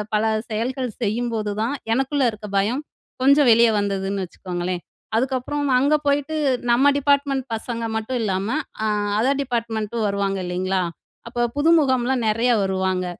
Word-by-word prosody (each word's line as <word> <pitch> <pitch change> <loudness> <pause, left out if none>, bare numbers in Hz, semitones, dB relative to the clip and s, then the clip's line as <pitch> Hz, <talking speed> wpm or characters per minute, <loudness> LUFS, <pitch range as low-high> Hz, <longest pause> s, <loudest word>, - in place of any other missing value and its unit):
பல 210 - +2 0.3
செயல்கள் 250 +4 -2
செய்யும்போதுதான் 220 +1 -1 0.2
எனக்குள்ள 270 +3 +1
இருக்க 215 0 -9
பயம் 240 +9 -1 0.4
கொஞ்சம் 280 -1 +5
வெளிய 230 +1 +6
வந்ததுன்னு 195 -1 -2
வச்சுக்கோங்களேன். 175 0 -4 0.3
அதுக்கப்றம் 265 +3 -1
அங்க 285 +4 +3
போயிட்டு 285 +2 +1 0.4
நம்ம 255 +4 +4
டிபார்ட்மெண்ட் 280 -1 +2
பசங்க 230 +1 -3
மட்டும் 220 +4 -2
இல்லாம, 195 0 -1 0.4
அ - - +1 0.3
அதர் 270 +5 +2
டிப்பார்ட்மெண்ட்டும் 230 -3 -2
வருவாங்க 200 -1 -1
இல்லைங்களா. 185 +2 -1 0.5
அப்ப 240 0 0
புதுமுகம்லாம் 265 -6 +3
நிறையா 235 +3 +2
வருவாங்க. 190 -1 0
235 Hz, 125 wpm, -22 LUFS, 200-265 Hz, 0.5 s, வெளிய